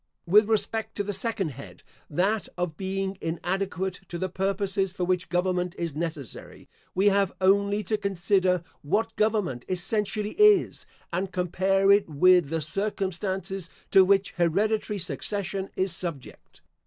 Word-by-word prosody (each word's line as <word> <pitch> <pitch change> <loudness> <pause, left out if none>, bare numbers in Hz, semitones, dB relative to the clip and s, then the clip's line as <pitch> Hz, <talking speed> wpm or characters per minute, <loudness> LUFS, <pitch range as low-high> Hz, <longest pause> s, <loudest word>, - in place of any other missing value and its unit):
With 205 +5 +5
respect 220 0 0
to 205 - -1
the 205 +1 -3
second 195 -3 -2
head, 140 0 -11 0.3
that 195 +8 0
of 175 -3 -2
being 195 +1 -3
inadequate 185 +2 -2
to 175 - -5
the 185 +2 -2
purposes 195 0 -1
for 185 - -3
which 180 0 0
government 180 0 0
is 170 -3 -3
necessary, 155 -5 -6 0.3
we 195 +3 +4
have 200 -1 +2
only 200 +2 +3
to 215 +1 -1
consider 185 -2 +1 0.2
what 220 +9 -1
government 210 - 0
essentially 210 +3 -1
is, 420 -1 +4 0.3
and 185 +2 -1
compare 190 +2 +2
it 200 -3 +4
with 175 +1 +4
the 165 0 -1
circumstances 190 +1 -3 0.2
to 190 - +8
which 195 +1 +3
hereditary 205 +5 +1
succession 195 +4 -3
is 190 0 0
subject. 165 -8 -7
190 Hz, 140 wpm, -26 LUFS, 175-200 Hz, 0.3 s, to